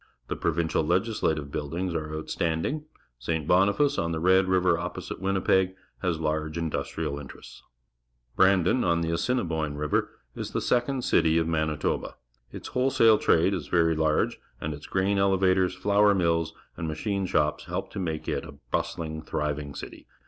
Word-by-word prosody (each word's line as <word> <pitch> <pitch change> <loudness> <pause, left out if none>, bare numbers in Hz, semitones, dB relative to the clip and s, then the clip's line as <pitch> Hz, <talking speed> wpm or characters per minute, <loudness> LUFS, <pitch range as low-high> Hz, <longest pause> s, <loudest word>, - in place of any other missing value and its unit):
The - - -1
Provincial 80 +1 0
Legislative 85 -5 0
Buildings 85 +5 -3
are 80 -2 -3
outstanding. 80 - -2 0.3
St. 80 -3 -2
Boniface, 100 +11 +3
on 85 0 -1
the 80 - -2
Red 95 +2 +4
River 95 -2 +3
opposite 85 +1 -5
Winni 95 -1 -1
peg, 95 0 +3 0.3
has 90 -4 0
large 75 0 -2
industrial 80 -3 -3
interests. 70 - -11 0.7
Brandon, 95 +5 +4
_on 85 -3 +1
the 80 - -1
Assinib 105 +2 0
oine 75 -2 -2
River, 75 0 0 0.3
is - - -5
the - - +1
second 125 +1 0
city 80 -6 +3
of 80 -1 +1
Manitoba. 80 -2 -1 0.4
Its - - -8
wholesale 125 -4 +4
trade 85 +4 +3
is 90 -6 -3
very 80 -2 +3
large, 80 -1 +1 0.2
and 75 - -3
its 75 +1 -10
grain 100 +1 +1
elevators, 95 -1 +3
flour 105 0 +3
mills, 85 -3 +1 0.2
and 85 - -4
mach 80 0 -5
ine 100 -2 0
shops 75 -3 0
help - - -4
to - - -5
make 80 -4 -3
it - - -1
a - - -10 0.2
bustUng, 80 -1 -2
thriving 75 -2 -3
city. - - -9
85 Hz, 165 wpm, -27 LUFS, 80-95 Hz, 0.7 s, Red